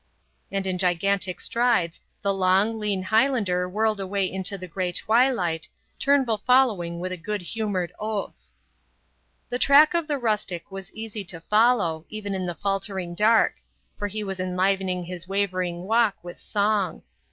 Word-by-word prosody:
And 195 Hz, -1 st, -2 dB
in 185 Hz, -1 st, -1 dB
gigantic 185 Hz, +1 st, +1 dB
strides 230 Hz, -9 st, +1 dB, 0.2 s
the 200 Hz, 0 st, +2 dB
long, 195 Hz, +4 st, +2 dB
lean 205 Hz, -3 st, -1 dB
Highlander 205 Hz, -4 st, +2 dB
whirled 215 Hz, +2 st, +1 dB
away 195 Hz, 0 st, -1 dB
into 190 Hz, +2 st, -1 dB
the 185 Hz, -, -7 dB
grey 180 Hz, 0 st, -2 dB
twilight, 185 Hz, -7 st, +1 dB, 0.3 s
Turnbull 265 Hz, -6 st, +2 dB
following 210 Hz, -9 st, +2 dB
with 185 Hz, +1 st, -3 dB
a 185 Hz, -, -3 dB
good 205 Hz, +3 st, -4 dB
humoured 195 Hz, -3 st, -2 dB
oath. 215 Hz, -1 st, -4 dB, 1.0 s
The 245 Hz, -, -2 dB
track 290 Hz, +5 st, +6 dB
of 340 Hz, -2 st, 0 dB
the 295 Hz, -2 st, 0 dB
rustic 210 Hz, -8 st, -2 dB
was 195 Hz, -1 st, -8 dB
easy 220 Hz, -1 st, -6 dB
to 165 Hz, -2 st, -6 dB
follow, 210 Hz, -6 st, +2 dB
even 210 Hz, -2 st, -5 dB
in 185 Hz, -1 st, -2 dB
the 175 Hz, -, -3 dB
faltering 195 Hz, -2 st, -3 dB
dark; 220 Hz, +5 st, +3 dB, 0.4 s
for 205 Hz, -, -1 dB
he 210 Hz, +1 st, -4 dB
was 195 Hz, -2 st, -5 dB
enlivening 185 Hz, 0 st, 0 dB
his 180 Hz, 0 st, -7 dB
wavering 185 Hz, -3 st, -1 dB
walk 220 Hz, 0 st, +2 dB
with 175 Hz, 0 st, -9 dB
song. 205 Hz, -4 st, 0 dB
195 Hz, 150 wpm, -25 LUFS, 180-220 Hz, 1.0 s, track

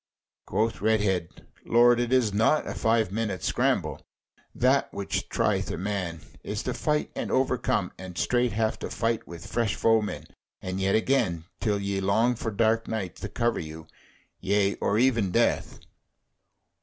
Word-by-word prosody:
Quoth 110 Hz, -1 st, 0 dB
Redhead: 100 Hz, -5 st, +2 dB, 0.4 s
"Lord, 120 Hz, +1 st, +5 dB
it 120 Hz, 0 st, -1 dB
is 125 Hz, -6 st, +3 dB
naught, 115 Hz, +9 st, +3 dB
a -, -, -4 dB
five 110 Hz, -3 st, +1 dB
minutes' 105 Hz, -5 st, -2 dB
scramble. -, -, 0 dB, 0.5 s
That 130 Hz, +3 st, +2 dB
which 100 Hz, -, -3 dB
trieth -, -, 0 dB
a -, -, -3 dB
man, 95 Hz, -4 st, -3 dB, 0.2 s
is -, -, -4 dB
to -, -, -2 dB
fight 150 Hz, 0 st, -1 dB
and -, -, -3 dB
overcome, 125 Hz, -7 st, +1 dB
and 90 Hz, -2 st, -8 dB
straight 125 Hz, -1 st, +1 dB
have 110 Hz, 0 st, 0 dB
to -, -, -5 dB
fight 115 Hz, 0 st, -1 dB
with 85 Hz, -1 st, -9 dB
fresh 115 Hz, -3 st, -1 dB
foemen, 110 Hz, -2 st, +1 dB, 0.3 s
and 90 Hz, +1 st, -4 dB
yet 95 Hz, 0 st, +2 dB
again, 110 Hz, -8 st, +1 dB, 0.2 s
till 105 Hz, -3 st, +1 dB
ye 100 Hz, -1 st, -2 dB
long 110 Hz, +6 st, +2 dB
for 115 Hz, -1 st, -4 dB
dark 110 Hz, +2 st, +1 dB
night 100 Hz, -6 st, -3 dB
to -, -, -6 dB
cover 120 Hz, -1 st, 0 dB
you 80 Hz, 0 st, -8 dB, 0.5 s
yea, 100 Hz, +1 st, +2 dB
or 100 Hz, -, 0 dB
even 115 Hz, -5 st, +3 dB
death." 115 Hz, +6 st, +1 dB
110 Hz, 155 wpm, -27 LUFS, 95-115 Hz, 0.5 s, Lord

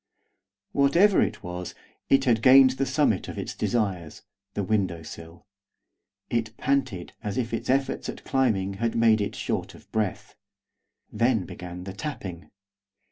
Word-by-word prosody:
Whatever 170 Hz, +9 st, +4 dB
it -, -, -1 dB
was, 90 Hz, 0 st, -6 dB, 0.3 s
it 135 Hz, 0 st, +4 dB
had 115 Hz, -4 st, +3 dB
gained 130 Hz, +1 st, +8 dB
the 135 Hz, +1 st, -2 dB
summit 130 Hz, -, +1 dB
of -, -, -7 dB
its -, -, -4 dB
desires, 95 Hz, -9 st, -2 dB, 0.3 s
the 100 Hz, -, -1 dB
window 95 Hz, -5 st, 0 dB
sill. 80 Hz, +3 st, -11 dB, 0.9 s
It 115 Hz, -2 st, -1 dB
panted 130 Hz, -10 st, -1 dB
as 105 Hz, -3 st, -4 dB
if 120 Hz, -2 st, -2 dB
its 115 Hz, -, -3 dB
efforts 135 Hz, +1 st, 0 dB
at -, -, -7 dB
climbing 110 Hz, -8 st, +1 dB
had 115 Hz, -1 st, 0 dB
made 115 Hz, -2 st, +4 dB
it 100 Hz, -, -2 dB
short -, -, -3 dB
of -, -, -18 dB
breath. 105 Hz, -4 st, -2 dB, 0.8 s
Then 115 Hz, -3 st, +1 dB
began 90 Hz, +1 st, -8 dB
the 95 Hz, 0 st, -7 dB
tapping. 95 Hz, -, -6 dB
110 Hz, 145 wpm, -26 LUFS, 95-130 Hz, 0.9 s, gained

